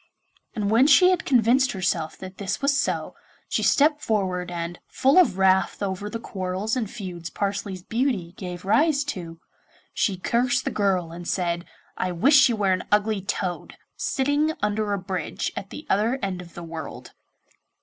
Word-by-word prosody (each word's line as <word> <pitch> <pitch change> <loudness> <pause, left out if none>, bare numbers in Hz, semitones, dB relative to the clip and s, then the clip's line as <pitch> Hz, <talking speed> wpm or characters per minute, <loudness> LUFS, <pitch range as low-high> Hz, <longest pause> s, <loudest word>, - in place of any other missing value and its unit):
And 205 -1 -1
when 240 +5 +5
she 365 +3 +7
had 360 -1 0
convinced 255 +1 +3
herself 175 -4 -1
that 185 0 -10
this 200 -2 -2
was 280 0 +2
so, 275 - -1 0.3
she - - -1
stepped 295 +1 +3
forward, 185 -5 -1
and, 170 0 -5
full 275 +7 +4
of 330 - +4
wrath 190 +1 +2
over 195 +1 -3
the 230 - -4
quarrels 195 0 -3
and 230 -5 -2
feuds 180 -7 -7
Parsley's 200 -2 -3
beauty 225 -7 -1
gave 180 -1 -7
rise 280 +8 +3
to, 175 - -6 0.5
she 195 -3 0
cursed 245 +6 +1
the - - -1
girl 185 -5 0
and 170 +1 -8
said, 175 -2 -1 0.3
'I 185 -1 -1
wish 270 - +6
you 235 - +1
were 200 -3 +2
an 185 - -2
ugly 210 0 +2
toad, 185 -2 -4 0.2
sitting 290 +3 0
under 210 0 0
a 200 - +1
bridge 185 -1 -3
at 195 - -6
the 300 - -9
other 220 +6 +1
end 185 -2 -2
of 170 -1 -14
the 175 - -7
world. 160 -2 -8
200 Hz, 170 wpm, -24 LUFS, 180-245 Hz, 0.5 s, she